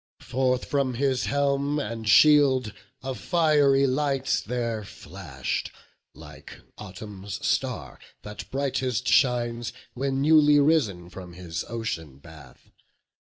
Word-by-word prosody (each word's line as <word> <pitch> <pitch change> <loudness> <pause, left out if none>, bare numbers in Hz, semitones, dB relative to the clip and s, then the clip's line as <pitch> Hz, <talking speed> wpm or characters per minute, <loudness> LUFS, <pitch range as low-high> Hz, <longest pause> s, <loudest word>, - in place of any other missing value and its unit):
Forth 130 0 -1
from 135 -3 -1
his 135 0 0
helm 140 +1 0
and 115 -6 -4
shield 135 -2 +5 0.3
a 135 0 -3
fiery 145 -4 +3
light 135 0 0
There 115 -2 -2
flash'd, 85 -9 -6 0.5
like 75 -3 -13 0.2
autumn's 100 -1 -8
star, - - -2 0.2
that 105 0 -9
brightest 130 -2 -2
shines 120 -2 +1 0.2
When 135 +1 -2
newly 150 0 +5
risen 110 - +1
from 90 -3 -10
his 85 -2 -5
ocean 85 - -5
bath. 75 -4 -16
125 Hz, 110 wpm, -25 LUFS, 100-140 Hz, 0.5 s, shield